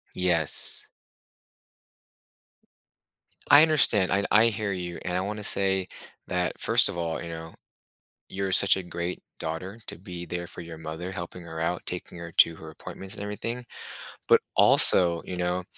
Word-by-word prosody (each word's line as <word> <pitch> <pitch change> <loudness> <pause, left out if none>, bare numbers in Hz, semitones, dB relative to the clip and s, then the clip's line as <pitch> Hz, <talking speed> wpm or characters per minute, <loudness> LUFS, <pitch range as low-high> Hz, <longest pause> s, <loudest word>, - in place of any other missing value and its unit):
Yes. 85 -4 +1 2.6
I 145 - +8
understand, 140 - +4
and 100 +2 0
I 110 +2 +5
hear 105 -2 -3
you, 90 -2 -6
and 90 -1 -2
I - - -1
wanna 105 +2 -5
say 95 -2 +2 0.4
that, 90 -1 -3
1st - - +4
of - - -7
all, 85 -1 -4
you 85 - -8
know, 80 0 -9 0.8
you're 95 0 -4
such 100 +1 +5
a 95 - -4
great 85 0 -6 0.2
daughter 90 +7 -6
to - - -7
be 90 -2 -9
there 85 0 -6
for 90 - -7
your 80 -1 -11
mother, 80 +3 -7
helping 90 -1 -8
her 80 -1 -9
out, 90 +2 -2
taking 90 -1 -7
her 85 0 -9
to 85 -1 +5
her 80 0 -11
appointments 95 +4 -6
and - - -6
everything. 115 +4 -6 0.6
But, - - +4
also, 85 -2 +6
you 90 - -6
know, 90 +1 -2
90 Hz, 160 wpm, -25 LUFS, 85-95 Hz, 2.6 s, I